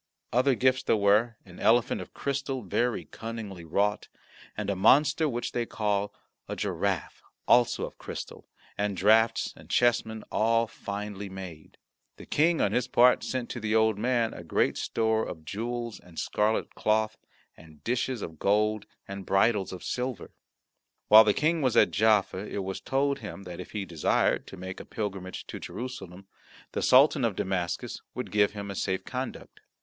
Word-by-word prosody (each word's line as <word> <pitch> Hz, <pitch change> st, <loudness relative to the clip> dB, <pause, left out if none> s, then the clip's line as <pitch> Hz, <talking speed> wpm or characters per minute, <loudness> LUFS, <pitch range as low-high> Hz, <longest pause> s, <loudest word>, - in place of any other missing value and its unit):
Other 130 Hz, +2 st, +3 dB
gifts 130 Hz, +1 st, +2 dB
there 115 Hz, -, +2 dB
were, 105 Hz, +3 st, +3 dB
an 90 Hz, -2 st, -13 dB
elephant 120 Hz, +1 st, +3 dB
of -, -, -10 dB
crystal, 135 Hz, -2 st, -3 dB
very 120 Hz, +5 st, -1 dB
cunningly 110 Hz, -5 st, -7 dB
wrought, 100 Hz, +6 st, 0 dB, 0.5 s
and -, -, -3 dB
a -, -, -1 dB
monster 150 Hz, -, +4 dB
which 120 Hz, -2 st, -3 dB
they 120 Hz, -1 st, -2 dB
call 105 Hz, -1 st, -1 dB, 0.4 s
a -, -, -4 dB
giraffe, -, -, -2 dB, 0.3 s
also 120 Hz, -1 st, +4 dB
of -, -, -11 dB
crystal, -, -, -8 dB, 0.3 s
and 100 Hz, -2 st, -1 dB
draughts 110 Hz, +3 st, +3 dB
and -, -, -16 dB
chessmen, 115 Hz, -2 st, +1 dB
all 115 Hz, +1 st, +2 dB
finely 100 Hz, -2 st, -6 dB
made. 95 Hz, -5 st, -10 dB, 0.4 s
The -, -, -11 dB
King, 165 Hz, +2 st, +2 dB
on -, -, +2 dB
his 125 Hz, 0 st, 0 dB
part, 125 Hz, 0 st, +5 dB
sent 130 Hz, -2 st, -3 dB
to 120 Hz, -, -5 dB
the 110 Hz, -1 st, -1 dB
Old 110 Hz, -2 st, +3 dB
Man 120 Hz, -1 st, +1 dB
a 85 Hz, -, -9 dB
great 80 Hz, -, +1 dB
store 110 Hz, 0 st, 0 dB
of 80 Hz, -2 st, -7 dB
newels, 120 Hz, +5 st, -4 dB
and 85 Hz, -2 st, -17 dB
scarlet 105 Hz, +1 st, 0 dB
cloth, 110 Hz, 0 st, 0 dB, 0.4 s
and 80 Hz, -2 st, -17 dB
dishes 125 Hz, -1 st, -1 dB
of 80 Hz, -2 st, -8 dB
gold 105 Hz, +1 st, +1 dB, 0.2 s
and 100 Hz, 0 st, -6 dB
bridles 95 Hz, +1 st, +2 dB
of 95 Hz, -, -8 dB
silver. 125 Hz, -2 st, -4 dB, 0.8 s
While 110 Hz, +1 st, +10 dB
the 105 Hz, -, +3 dB
King 160 Hz, +2 st, +1 dB
was 130 Hz, -4 st, +1 dB
at -, -, +5 dB
Jaffa 105 Hz, -3 st, +3 dB
it 100 Hz, 0 st, -4 dB
was 95 Hz, 0 st, -5 dB
told 140 Hz, +1 st, 0 dB
him 100 Hz, -3 st, -8 dB
that 90 Hz, -2 st, -8 dB
if 90 Hz, -, -9 dB
he 105 Hz, -2 st, -3 dB
desired 85 Hz, -4 st, +1 dB
to 95 Hz, -, -10 dB
make 95 Hz, +1 st, -7 dB
a -, -, -7 dB
pilgrimage 95 Hz, -4 st, -5 dB
to -, -, -7 dB
Jerusalem 100 Hz, -6 st, -7 dB, 0.5 s
the -, -, -2 dB
Sultan 135 Hz, +1 st, +5 dB
of 115 Hz, -4 st, +1 dB
Damascus 90 Hz, -3 st, -2 dB
would -, -, -5 dB
give 105 Hz, -1 st, +3 dB
him 100 Hz, -1 st, -6 dB
a -, -, -6 dB
safe 95 Hz, 0 st, -2 dB
conduct. 130 Hz, 0 st, -6 dB
110 Hz, 170 wpm, -28 LUFS, 100-120 Hz, 0.8 s, While